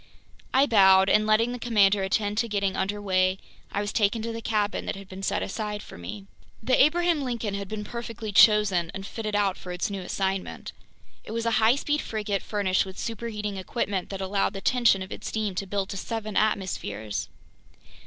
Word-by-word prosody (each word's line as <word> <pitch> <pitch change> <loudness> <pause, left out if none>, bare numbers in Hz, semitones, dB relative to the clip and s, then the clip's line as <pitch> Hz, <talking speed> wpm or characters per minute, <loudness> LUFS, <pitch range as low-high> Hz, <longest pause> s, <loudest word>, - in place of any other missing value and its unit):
I 265 +2 +5
bowed, 190 -5 +6
and 215 0 +4
letting 225 +3 +3
the 245 - -5
commander 210 -4 +3
attend 205 +2 0
to 235 - +1
getting 200 -3 -1
under 205 +2 -1
way, 185 -2 +2 0.3
I 200 - -1
was 205 0 -3
taken 215 +1 +1
to 230 - -3
the 230 0 -5
cabin 210 -2 -1
that - - -2
had 195 -1 -10
been 190 0 -9
set 195 - 0
aside 210 0 -4
for - - -12
me. 140 - -8 0.4
The 255 +3 +3
Abraham 340 +1 +2
Lincoln 235 -5 -3
had 200 0 -4
been 215 +1 -5
perfectly 230 -1 -6
chosen 200 -5 +5
and 195 0 -6
fitted 215 0 -4
out 200 -2 +1
for 180 - -8
its 180 +3 -2
new 195 -1 -4
assignment. 190 +1 -3 0.5
It 215 - -8
was 230 0 -2
a 230 - +2
high 225 +3 +5
speed 295 +1 -1
frigate 210 -3 -2
furnished 200 -3 +1
with 190 -1 -10
superheating 215 -3 -4
equipment 190 -1 -2
that 195 -1 -5
allowed 195 +1 0
the 195 - -6
tension 235 -6 +3
of 190 - -11
its - - -6
steam 215 -3 -2
to 195 +2 -4
build 195 0 -2
to 200 - -5
seven 215 +1 -4
atmospheres. 110 - -1
205 Hz, 200 wpm, -26 LUFS, 195-225 Hz, 0.5 s, bowed